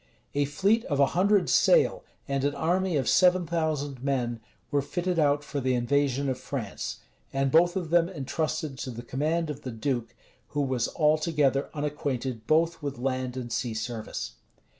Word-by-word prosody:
A 145 0 +2
fleet 195 +11 +2
of 145 -4 -1
a 140 - +7
hundred 200 +2 +3
sail, - - +4 0.2
and 140 -1 -1
an 145 0 +1
army 175 +3 +1
of 130 - -1
seven 180 -1 +4
thousand 150 -5 -2
men, 125 -4 -1 0.3
were 145 -1 +2
fitted 175 +5 -1
out 145 -1 +3
for 145 - -4
the 130 0 +1
invasion 140 +2 +1
of 130 -1 -1
France, - - -5 0.3
and 135 0 0
both 175 +2 +5
of 175 -4 -3
them 170 0 +4
intrusted 155 -2 -3
to 130 - -4
the 120 -1 -7
command 155 +6 -1
of 145 0 -8
the 130 - -5
duke, 120 0 -3 0.3
who 145 - -2
was 130 -3 0
altogether 150 -3 +2
unacquainted 135 -6 -3
both 165 +3 +2
with 140 -1 -4
land 130 0 -2
and 120 -2 -4
sea 120 -3 -2
service. 110 0 -4
145 Hz, 170 wpm, -27 LUFS, 130-165 Hz, 0.3 s, a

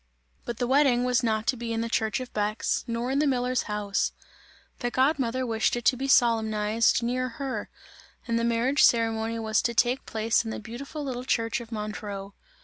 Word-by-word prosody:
But 235 - -4
the 245 - 0
wedding 260 -1 +3
was 250 -1 +2
not 220 -2 0
to 255 - +1
be 235 -1 -5
in 225 0 -1
the 230 - -2
church 220 +1 0
of 255 -1 -8
Bex, 210 +1 -1
nor 235 +2 -2
in 275 - +1
the 300 - +2
miller's 250 -1 0
house; 205 -1 -1 0.7
the 245 - -1
god 270 +5 +2
mother 255 +1 -1
wished 225 -1 +1
it 240 0 -5
to 255 - +5
be 270 +2 -3
solemnized 225 -3 +3
near 255 +2 -1
her, 270 -2 -4 0.6
and 230 -1 +1
the - - -1
marriage 235 +5 +2
ceremony 225 -1 +2
was 220 -1 +1
to 235 - -1
take 245 +3 +1
place 220 +1 +1
in 225 - -5
the - - -4
beautiful 260 +7 -7
little 250 -3 -4
church 230 -2 0
of 235 0 -11
Montreux. 210 -2 -5
235 Hz, 200 wpm, -27 LUFS, 220-255 Hz, 0.7 s, to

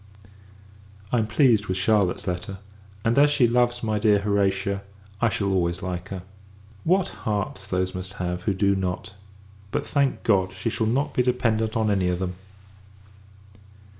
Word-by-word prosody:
I 120 - +3
am 110 - 0
pleased 110 -2 +3
with 95 - -1
Charlotte's 95 -2 +2
letter; 90 +1 -3 0.5
and, 115 +4 +3
as 145 +1 +6
she 145 -4 +3
loves 120 0 +1
my 110 -1 0
dear 105 -1 +4
Horatia, 100 -1 0 0.4
I 115 - +4
shall 100 -3 -1
always 85 -2 0
like 90 +1 -4
her. 95 -2 -6 0.6
What 185 +2 +2
hearts 100 -2 -3
those 95 -1 -1
must 95 0 -5
have, 90 -1 -3
who 95 +1 0
do 100 +1 +2
not! 95 0 -3 0.6
But, - - -2
thank 140 -2 0
God, 95 -4 +2
she 95 +5 -3
shall 110 - 0
not 135 +6 0
be - - +2
dependent 115 -3 +1
on 110 -1 +2
any 95 -3 +1
of 90 0 0
them. 90 0 -3
100 Hz, 165 wpm, -25 LUFS, 95-115 Hz, 0.6 s, as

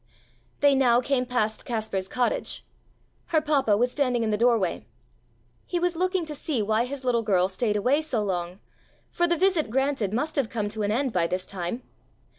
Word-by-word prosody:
They 285 -1 +6
now 250 -3 +4
came 255 0 0
past 220 -3 -1
Kaspar's 215 -5 -3
cottage. 255 - -2 0.6
Her 320 - +3
papa 280 -9 +2
was 245 +3 +1
standing 250 -5 0
in 220 - 0
the - - +2
doorway. 230 -6 +1 0.8
He 355 - -1
was 350 0 0
looking 370 0 0
to 310 - -5
see 290 -2 -2
why 220 +3 +1
his 270 +1 -6
little 245 -2 +2
girl 185 -4 +2
stayed 210 +3 -1
away 255 +9 +2
so 260 -9 -1
long, 180 -2 -3 0.5
for 345 - +1
the 345 0 +1
visit 355 - +2
granted 265 -4 0
must 295 +8 -2
have 265 -5 +1
come 210 -3 -2
to 215 +1 -5
an 205 0 0
end 255 +2 0
by 170 -2 +2
this 185 +1 -3
time. 190 +6 -5
245 Hz, 190 wpm, -26 LUFS, 210-285 Hz, 0.8 s, They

